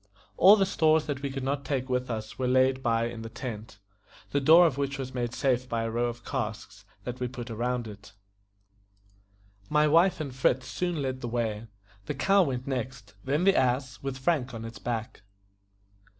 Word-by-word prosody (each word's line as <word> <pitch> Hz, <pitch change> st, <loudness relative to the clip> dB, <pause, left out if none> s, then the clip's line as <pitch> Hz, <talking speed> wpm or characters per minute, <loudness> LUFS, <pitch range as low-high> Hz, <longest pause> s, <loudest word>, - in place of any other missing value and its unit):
All 200 Hz, +3 st, +8 dB
the 195 Hz, -2 st, +2 dB
stores 160 Hz, -4 st, +3 dB
that 145 Hz, -3 st, -4 dB
we 140 Hz, -, -2 dB
could 135 Hz, -1 st, -5 dB
not 140 Hz, +1 st, -1 dB
take 130 Hz, -1 st, -2 dB
with 125 Hz, -1 st, -1 dB
us 110 Hz, 0 st, -5 dB
were 130 Hz, -, 0 dB
laid 130 Hz, +1 st, +3 dB
by 115 Hz, -2 st, +1 dB
in 115 Hz, -1 st, -5 dB
the 115 Hz, -, -7 dB
tent, 110 Hz, -3 st, -7 dB, 0.5 s
the 140 Hz, -, +1 dB
door 165 Hz, +5 st, +7 dB
of 155 Hz, -6 st, +1 dB
which 140 Hz, 0 st, -2 dB
was 130 Hz, -1 st, -5 dB
made 120 Hz, -2 st, -2 dB
safe 125 Hz, 0 st, 0 dB
by 115 Hz, -1 st, -1 dB
a 115 Hz, -, -2 dB
row 120 Hz, +1 st, 0 dB
of 120 Hz, -1 st, -7 dB
casks, 105 Hz, -5 st, -5 dB, 0.2 s
that 125 Hz, 0 st, -6 dB
we 125 Hz, -, -1 dB
put 120 Hz, -1 st, -7 dB
round 120 Hz, +1 st, -2 dB
it. 105 Hz, -1 st, -11 dB, 1.6 s
My 150 Hz, 0 st, +4 dB
wife 170 Hz, +5 st, +4 dB
and 140 Hz, -4 st, -4 dB
Fritz 130 Hz, 0 st, +1 dB
soon 165 Hz, +3 st, -2 dB
led 130 Hz, -1 st, -3 dB
the 120 Hz, -, -3 dB
way; 115 Hz, -2 st, -2 dB, 0.4 s
the 150 Hz, -, -2 dB
cow 195 Hz, +8 st, +4 dB
went 130 Hz, -7 st, -1 dB
next; 125 Hz, -5 st, -5 dB
then 145 Hz, +6 st, 0 dB
the 195 Hz, 0 st, +5 dB
ass, 130 Hz, 0 st, 0 dB
with 135 Hz, -1 st, -4 dB
Frank 135 Hz, -3 st, 0 dB
on 115 Hz, 0 st, -6 dB
its 115 Hz, 0 st, -9 dB
back. 115 Hz, -2 st, -4 dB
130 Hz, 195 wpm, -28 LUFS, 120-140 Hz, 1.6 s, All